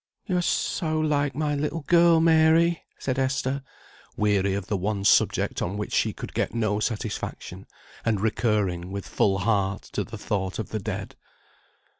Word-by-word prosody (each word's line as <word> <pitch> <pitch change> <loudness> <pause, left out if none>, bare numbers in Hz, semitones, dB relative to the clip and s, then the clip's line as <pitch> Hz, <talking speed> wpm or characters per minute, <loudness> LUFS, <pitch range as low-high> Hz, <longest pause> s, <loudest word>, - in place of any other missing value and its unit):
"You 185 - -1
are - - +2
so 160 -2 0
like 145 -2 +1
my 150 0 0
little 150 +3 -2
girl, 170 +2 +5
Mary!" 165 +1 +4 0.2
said 130 0 -2
Esther, 135 +1 0 0.6
weary 100 -2 +2
of 100 -2 -3
the 105 - -2
one 100 +1 -2
subject - - +3
on 95 +4 -2
which 105 - -4
she - - +2
could - - -8
get - - -1
no 110 -3 0
satisfaction, 110 -1 -4 0.4
and 110 -3 +1
recurring, 100 -5 0
with 100 0 -5
full 95 -2 +2
heart, 100 -1 0
to - - 0
the - - -8
thought 95 -2 -2
of 110 - -4
the 110 - -3
dead. 95 - -5
110 Hz, 165 wpm, -25 LUFS, 100-155 Hz, 0.6 s, girl